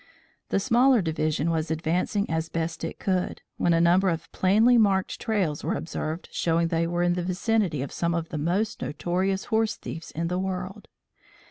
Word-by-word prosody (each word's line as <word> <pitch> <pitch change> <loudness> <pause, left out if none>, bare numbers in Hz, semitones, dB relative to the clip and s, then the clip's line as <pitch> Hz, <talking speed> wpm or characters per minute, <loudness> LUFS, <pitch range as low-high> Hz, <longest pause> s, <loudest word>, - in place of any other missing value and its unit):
The - - +2
smaller 250 +4 +4
division 155 0 0
was 160 -1 -1
advancing 175 +5 0
as 160 0 -2
best 165 0 -3
it 165 - -4
could, 185 -2 -1
when 175 - +2
a 165 - +4
number 180 +3 +4
of 165 -1 -4
plainly 215 +6 +4
marked 200 -4 +2
trails 190 -10 -1
were - - -1
observed 160 +1 -4
showing 165 0 +1
they 165 0 +1
were 175 +1 0
in 175 0 +3
the 180 - -1
vicinity 185 - 0
of 140 - -6
some 170 0 -1
of 165 -1 -3
the 155 - -4
most 185 +8 -1
notorious 185 +5 -1
horse 220 0 +2
thieves 165 - -8
in 165 +2 -3
the 180 +1 -1
world. 190 +2 -4
175 Hz, 185 wpm, -26 LUFS, 165-195 Hz, -, smaller